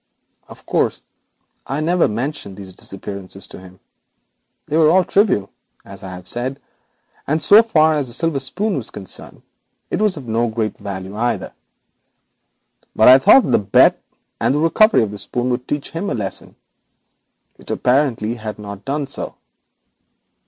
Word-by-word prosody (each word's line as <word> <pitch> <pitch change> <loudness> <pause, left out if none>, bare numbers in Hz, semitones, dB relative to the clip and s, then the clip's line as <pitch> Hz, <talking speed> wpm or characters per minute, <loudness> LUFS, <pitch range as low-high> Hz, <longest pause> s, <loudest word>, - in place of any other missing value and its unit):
Of - - -15
course, - - 0 0.6
I 135 - -2
never 170 +3 +2
mentioned 115 -3 -4
these 95 -2 -9
abstractions 95 0 -8
to - - -11
him. 95 0 -15 0.9
They 150 - -3
were 160 -1 +5
all 185 +3 +5
trivial, 190 - +1 0.3
as 100 0 -11
I 95 - -8
have 90 0 -10
said, 130 +3 -3 0.7
and 155 +3 +1
so 205 +8 +7
far 160 -9 +3
as 145 -3 -1
the 120 - -7
silver 165 0 0
spoon 185 +9 -2
was 120 - -4
concerned, 95 -3 -9 0.5
it - - -1
was 210 -5 +1
of 135 -4 -9
no 115 +1 +1
great 110 -2 -2
value 95 0 -6
either. 120 +3 -2 1.4
But 110 - +6
I 130 +1 +9
thought 265 - +7
the - - +4
bet 100 0 +4 0.4
and 135 - +1
the - - +1
recovery 165 - +4
of 105 - -3
the 105 - -7
spoon 120 +5 -2
would 125 +1 -3
teach 145 -1 -3
him 165 +5 -3
a - - -1
lesson; 100 -4 -4 1.0
it - - -15
apparently 125 -4 +1
has 110 -3 -7
not 100 -1 -9
done 145 +4 -2
so. - - -5
125 Hz, 160 wpm, -19 LUFS, 100-155 Hz, 1.4 s, I